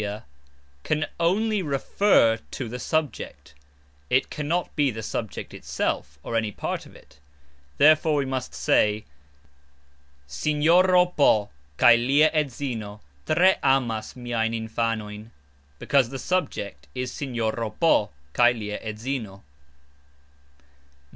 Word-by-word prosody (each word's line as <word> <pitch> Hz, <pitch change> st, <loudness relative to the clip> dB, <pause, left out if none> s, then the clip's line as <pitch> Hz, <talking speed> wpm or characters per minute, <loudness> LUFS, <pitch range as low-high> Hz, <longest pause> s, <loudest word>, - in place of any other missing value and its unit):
"Si", -, -, -2 dB
"sia", 105 Hz, +2 st, -7 dB, 0.6 s
can 155 Hz, 0 st, 0 dB
only 205 Hz, +5 st, +1 dB
"refer 140 Hz, -, +2 dB
to" 130 Hz, -, -5 dB
the 125 Hz, +3 st, -6 dB
subject, 150 Hz, -, -3 dB, 0.6 s
it 130 Hz, -, +1 dB
cannot 165 Hz, +3 st, -2 dB
be 145 Hz, -3 st, +2 dB
the 110 Hz, -2 st, -6 dB
subject 110 Hz, 0 st, -5 dB
itself 70 Hz, +1 st, -3 dB
or 115 Hz, -, -4 dB
any 110 Hz, -2 st, 0 dB
part -, -, -4 dB
of -, -, -18 dB
it; 70 Hz, -, -19 dB, 0.6 s
therefore 155 Hz, +1 st, +5 dB
we 140 Hz, -1 st, +1 dB
must 130 Hz, -1 st, -4 dB
say 105 Hz, 0 st, +2 dB, 1.2 s
"Sinjoro 165 Hz, -, +3 dB
P. 110 Hz, -12 st, +2 dB, 0.3 s
kaj 120 Hz, 0 st, +5 dB
lia 150 Hz, +3 st, +5 dB
edzino 125 Hz, -8 st, -3 dB, 0.3 s
tre 185 Hz, +4 st, +4 dB
amas 120 Hz, -5 st, 0 dB
miajn 115 Hz, -2 st, -2 dB
infanojn", 110 Hz, -1 st, -3 dB, 0.5 s
because 135 Hz, -, +2 dB
the 135 Hz, -, -6 dB
subject 105 Hz, -, -3 dB
is 125 Hz, 0 st, -3 dB
"Sinjoro 115 Hz, -5 st, -3 dB
P. 110 Hz, -, +2 dB, 0.2 s
kaj 120 Hz, 0 st, +4 dB
lia 105 Hz, -1 st, -5 dB
edzino." 110 Hz, -2 st, -5 dB
125 Hz, 115 wpm, -25 LUFS, 110-150 Hz, 1.2 s, therefore